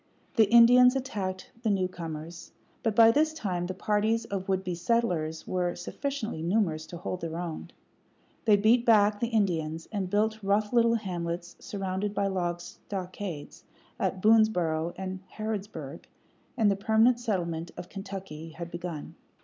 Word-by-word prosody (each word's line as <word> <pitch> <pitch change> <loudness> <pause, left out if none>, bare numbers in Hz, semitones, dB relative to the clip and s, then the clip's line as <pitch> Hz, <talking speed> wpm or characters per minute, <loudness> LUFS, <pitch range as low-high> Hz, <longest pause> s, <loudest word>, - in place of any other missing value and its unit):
The 220 -4 +5
Indians 245 +2 +7
attacked 195 -8 -4
the 225 - 0
newcomers; 170 -4 -4 0.3
but 225 -3 0
by 225 0 +8
this 310 +5 +2
time 180 - -2
the 185 - -4
parties 215 +3 +1
of 195 -2 -4
would 190 0 +1
be 180 -1 -3
settlers 170 -5 0
were 180 -1 -1
sufficiently 225 - -4
numerous 165 -3 0
to 175 - -8
hold 180 +1 -5
their 165 0 -4
own. 170 -2 -5 0.8
They 215 -2 +6
beat 220 +4 +4
back 210 -3 +4
the 235 - 0
Indians, 165 -8 0
and 195 -4 -2
built 215 +2 +1
rough 205 +2 +1
little 230 -1 +4
hamlets, 175 -4 -4
surrounded 195 +1 -3
by 200 - +1
log 175 -3 -1
stockades, 180 -2 -7 0.4
at 185 - -1
Boonesborough 180 -7 +3
and 190 0 -4 0.2
Harrodsburg; 215 -1 -5 0.5
and 215 -4 +4
the - - +1
permanent 220 +4 +3
settlement 170 -7 -2
of 175 - -7
Kentucky 190 -5 -7
had 170 0 -7
begun. 170 -3 -6
195 Hz, 150 wpm, -28 LUFS, 175-220 Hz, 0.8 s, by